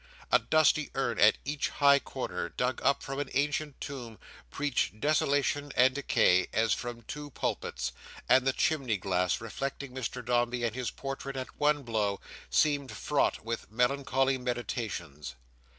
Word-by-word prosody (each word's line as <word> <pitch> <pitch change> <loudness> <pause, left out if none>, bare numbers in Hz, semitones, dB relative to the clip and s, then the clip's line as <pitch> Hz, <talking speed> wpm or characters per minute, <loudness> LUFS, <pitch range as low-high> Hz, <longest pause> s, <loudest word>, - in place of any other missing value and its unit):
A - - +6
dusty 155 -1 +3
urn 125 -4 -1
at 105 - +6
each 145 +1 -1
high 140 -1 +5
corner, 90 -11 -4
dug 125 +7 -2
up 140 - +2
from 135 +1 -4
an 145 -2 -3
ancient 145 +1 0
tomb, 120 -6 -7 0.3
preached 135 - -1
desolation 145 0 +1
and 130 +1 +5
decay, 95 -9 +3
as 115 0 +2
from 120 -1 -5
two 150 +5 -7
pulpits; 65 - -3 0.4
and 130 +1 +5
the - - +5
chimney 135 - 0
glass, 90 -2 0
reflecting 135 +4 -5
Mr 125 -1 -4
Dombey 120 0 +1
and 115 -2 0
his 125 0 -2
portrait 135 0 -6
at 130 - -7
one 145 -1 +2
blow, 105 -4 -1 0.3
seemed 145 -4 +2
fraught 110 - 0
with 115 -2 -4
melancholy 135 +2 +1
meditations. 110 - -4
130 Hz, 150 wpm, -30 LUFS, 115-140 Hz, 0.4 s, A